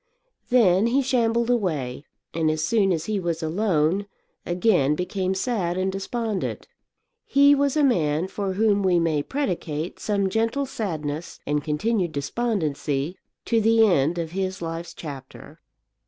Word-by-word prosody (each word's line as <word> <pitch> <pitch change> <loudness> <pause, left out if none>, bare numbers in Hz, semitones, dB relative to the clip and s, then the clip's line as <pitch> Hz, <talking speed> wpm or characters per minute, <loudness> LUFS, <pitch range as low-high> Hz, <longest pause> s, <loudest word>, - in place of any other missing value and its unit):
Then 220 -5 +4
he 270 +4 +2
shambled 235 -2 +1
away, 155 - -1 0.3
and 160 -1 +1
as 155 0 0
soon 195 +1 +2
as 165 -2 -1
he 215 -2 -1
was 170 -2 -2
alone, 180 +1 +1 0.4
again 175 -6 +2
became 185 +2 -2
sad 190 -5 -1
and 190 +1 0
despondent. 210 +1 -3 0.6
He 280 +1 +5
was 280 0 +1
a 300 - +3
man 165 - +2
for 195 0 -3
whom 205 0 +2
we 185 -2 +3
may 160 -3 +1
predicate 175 - -3
some 200 -2 0
gentle 230 +7 0
sadness 165 - -4
and 145 0 0
continued 175 +4 0
despondency 150 - -2 0.3
to 230 -1 +2
the 225 +1 +5
end 170 -4 +2
of 165 -2 -3
his 190 +1 -3
life's 165 0 -5
chapter. 140 -5 -10
185 Hz, 140 wpm, -24 LUFS, 160-225 Hz, 0.6 s, He